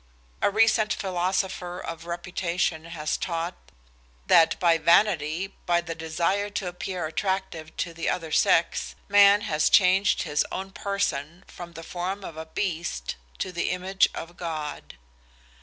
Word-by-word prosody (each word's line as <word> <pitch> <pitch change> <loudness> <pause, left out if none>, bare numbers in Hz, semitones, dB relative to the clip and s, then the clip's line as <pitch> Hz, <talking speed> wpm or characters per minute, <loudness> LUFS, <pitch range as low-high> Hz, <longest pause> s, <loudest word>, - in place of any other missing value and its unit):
A - - +4
recent 215 0 +3
philosopher 185 -1 -2
of 165 -1 -7
reputation 175 -1 -2
has 155 -2 -3
taught 170 0 -2 0.7
that 165 - +5
by 170 -2 +4
vanity, 170 +1 +3
by 175 -1 +4
the 170 -1 -5
desire 170 +5 -1
to 200 -1 -3
appear 180 -1 -4
attractive 165 -1 -3
to 170 - -2
the 165 0 -2
other 165 -3 -2
sex, 165 +2 +2
man 205 0 +7
has 155 -7 +1
changed 190 +1 +4
his 150 -3 +1
own 195 +1 -5
person 180 -5 -2
from 175 -1 -10
the 165 0 -9
form 185 +4 -4
of 165 - -7
a 160 0 -7
beast 160 - -3 0.2
to 185 - -3
the 175 -1 -1
image 185 +2 +2
of 175 +1 -8
God. 155 - -5
175 Hz, 140 wpm, -26 LUFS, 165-190 Hz, 0.7 s, man